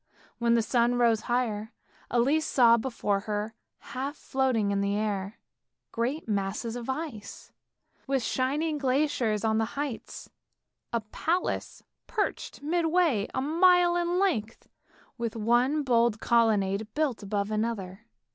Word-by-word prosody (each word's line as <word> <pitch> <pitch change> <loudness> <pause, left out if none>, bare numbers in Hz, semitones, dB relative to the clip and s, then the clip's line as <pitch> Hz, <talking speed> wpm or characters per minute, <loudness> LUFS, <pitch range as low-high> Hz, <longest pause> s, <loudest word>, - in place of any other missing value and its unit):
When 235 -1 +3
the 230 - +3
sun 240 +1 +2
rose 230 -3 +3
higher, 225 -3 -1 0.4
Elise 275 +6 +2
saw 235 -3 +6
before 225 -4 -1
her 210 +1 -3 0.4
half 275 +3 -3
floating 255 -8 0
in 200 0 0
the 200 0 0
air 205 -1 -2 0.5
great 245 +6 -2
masses 205 +3 -2
of 245 +1 -6
ice, 265 -7 -6 0.6
with 270 -2 0
shining 295 +6 0
glaciers 255 -6 +1
on 220 0 +2
the 225 +5 -3
heights. 285 -5 -5 0.6
A 235 - 0
palace 325 - -2
was - - -53
perched 420 -9 -3
midway 325 - +2
a 260 - 0
mile 350 +3 +4
in 350 0 0
length, 300 - -1 0.5
with 230 -1 -3
one 240 +7 +2
bold 235 -4 +2
colonnade 215 -3 +2
built 295 -8 0
above 200 0 -2
another. 215 -1 -3
235 Hz, 130 wpm, -28 LUFS, 215-285 Hz, 0.6 s, saw